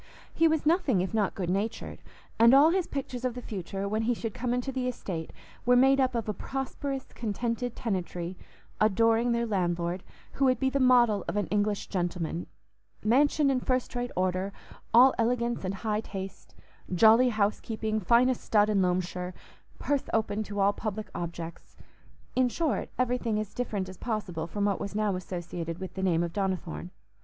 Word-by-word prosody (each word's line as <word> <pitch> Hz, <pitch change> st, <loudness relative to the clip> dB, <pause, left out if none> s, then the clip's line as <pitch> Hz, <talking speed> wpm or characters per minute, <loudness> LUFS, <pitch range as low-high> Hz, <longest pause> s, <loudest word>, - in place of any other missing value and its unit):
He 330 Hz, -, +4 dB
was 315 Hz, -2 st, +1 dB
nothing 300 Hz, -, +3 dB
if 185 Hz, -, -3 dB
not 210 Hz, -3 st, +1 dB
good 180 Hz, -3 st, -2 dB
natured; 205 Hz, +4 st, -3 dB, 0.4 s
and 235 Hz, +3 st, +8 dB
all 295 Hz, +4 st, +7 dB
his 370 Hz, -1 st, 0 dB
pictures 255 Hz, -3 st, -5 dB
of 250 Hz, -2 st, -1 dB
the -, -, -4 dB
future, 195 Hz, 0 st, -4 dB
when 215 Hz, +2 st, 0 dB
he 235 Hz, +2 st, +1 dB
should 225 Hz, -2 st, -4 dB
come 245 Hz, 0 st, -2 dB
into 250 Hz, +2 st, -1 dB
the 255 Hz, -1 st, -2 dB
estate, 180 Hz, -9 st, -4 dB, 0.3 s
were 245 Hz, +1 st, +4 dB
made 270 Hz, +2 st, +5 dB
up 255 Hz, -2 st, +2 dB
of 230 Hz, -2 st, -2 dB
a 210 Hz, -, -1 dB
prosperous, 270 Hz, +4 st, -4 dB
contented 235 Hz, +2 st, -2 dB
tenantry, 180 Hz, -4 st, -3 dB, 0.4 s
adoring 225 Hz, +3 st, +3 dB
their 235 Hz, 0 st, +1 dB
landlord, 175 Hz, -3 st, -1 dB, 0.3 s
who 275 Hz, -, +1 dB
would 255 Hz, -1 st, +3 dB
be 265 Hz, -1 st, +1 dB
the 275 Hz, -, +1 dB
model 240 Hz, -6 st, +4 dB
of -, -, -2 dB
an 205 Hz, -, +1 dB
English 205 Hz, 0 st, 0 dB
gentleman—mansion 210 Hz, -, -1 dB
in 260 Hz, -, +1 dB
first 255 Hz, 0 st, -1 dB
rate 245 Hz, 0 st, -2 dB
order, 185 Hz, +1 st, 0 dB, 0.4 s
all 255 Hz, +3 st, +7 dB
elegance 235 Hz, 0 st, 0 dB
and 190 Hz, +1 st, -2 dB
high 215 Hz, 0 st, +1 dB
taste—jolly 220 Hz, +3 st, +1 dB
housekeeping, 215 Hz, 0 st, -1 dB
finest 240 Hz, +5 st, +3 dB
stud 210 Hz, -1 st, +3 dB
in 200 Hz, -2 st, +3 dB
Loamshire—purse 180 Hz, +9 st, -3 dB
open 215 Hz, -1 st, 0 dB
to 205 Hz, -1 st, -5 dB
all 200 Hz, +1 st, +4 dB
public 215 Hz, -1 st, -5 dB
objects—in 170 Hz, +8 st, -5 dB
short, 315 Hz, +3 st, -1 dB
everything 245 Hz, -3 st, 0 dB
as 215 Hz, -2 st, -5 dB
different 210 Hz, -6 st, -2 dB
as 185 Hz, 0 st, -10 dB
possible 185 Hz, -8 st, -3 dB
from 205 Hz, +4 st, -1 dB
what 200 Hz, -2 st, +1 dB
was 200 Hz, -, -5 dB
now 210 Hz, -2 st, +1 dB
associated 175 Hz, -2 st, -5 dB
with 190 Hz, 0 st, -7 dB
the 190 Hz, -, -5 dB
name 175 Hz, -3 st, +2 dB
of 170 Hz, -1 st, -4 dB
Donnithorne. 185 Hz, -3 st, -2 dB
215 Hz, 165 wpm, -28 LUFS, 190-245 Hz, 0.4 s, and